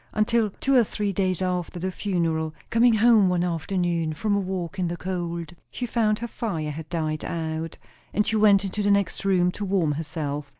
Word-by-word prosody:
Until, 215 +1 +2
two 275 - +1
or 250 -3 +6
three 205 -1 -2
days 185 -1 0
after 180 -1 -2
the 185 +2 -2
funeral, 165 -5 -1 0.2
coming 230 0 +5
home 220 -3 +5
one 180 -1 +1
afternoon 170 -1 -1
from 205 +6 0
a - - +2
walk 185 -2 -4
in 180 - +1
the 175 +1 -3
cold, 170 -3 -4 0.2
she 250 - -4
found 220 -3 +1
her 235 +2 -4
fire 170 -10 -3
had 155 +1 -8
died 155 -3 -2
out; 160 0 -4 0.3
and 210 - +1
she 220 - 0
went 205 -2 +5
into 195 +2 -3
the 205 - +1
next 200 -2 +1
room 180 -2 +3
to 205 - -6
warm 190 -6 +1
herself. 145 -1 -4
185 Hz, 200 wpm, -25 LUFS, 165-205 Hz, 0.3 s, or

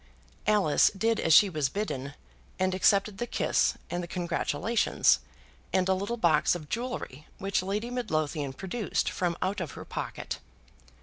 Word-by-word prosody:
Alice 205 -8 +4
did 225 +2 +1
as 165 - +1
she 200 +6 +8
was 155 -7 -1
bidden, 145 -8 -4 0.4
and 185 0 +1
accepted 195 +1 +2
the 240 - -2
kiss - - +1 0.2
and 175 - -1
the 175 - -6
congratulations, 180 +5 +1 0.5
and 185 -1 +2
a 190 - +4
little 200 +5 -2
box 170 -5 +3
of 155 -4 -8
jewellery 230 - -4
which 195 -1 0
Lady 205 +5 -3
Midlothian 155 - -1
produced 195 - -2
from 175 -2 -1
out 190 +2 -1
of 165 - -5
her - - -9
pocket. - - -5
185 Hz, 150 wpm, -28 LUFS, 160-210 Hz, 0.5 s, she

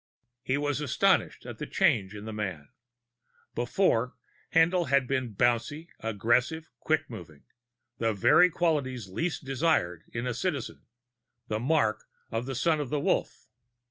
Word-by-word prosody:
He 130 +1 0
was 145 0 -1
astonished 180 +5 +1
at 120 -2 -8
the 150 - -4
change 115 - +2
in 105 0 -8
the 110 - -5
man. 95 -9 -4 0.8
Before, 120 -2 +1 0.4
Haendl 170 +2 +4
had 140 0 +3
been 130 -4 -2
bouncy, 120 - 0
aggressive, 120 +9 0
quick 155 -1 0
moving 85 -10 -10 0.6
the 115 -1 +2
very 135 - +5
qualities 140 - -1
least 145 - -3
desired 135 - +1
in 115 +1 -3
a 125 - -1
Citizen, 140 -1 -3 0.6
the 110 - -1
mark 115 -5 +1 0.3
of 115 +3 -2
the 135 - -3
Son 160 +4 +2
of 145 -4 -3
the 150 - 0
Wolf. - - -1
130 Hz, 140 wpm, -28 LUFS, 110-155 Hz, 0.8 s, very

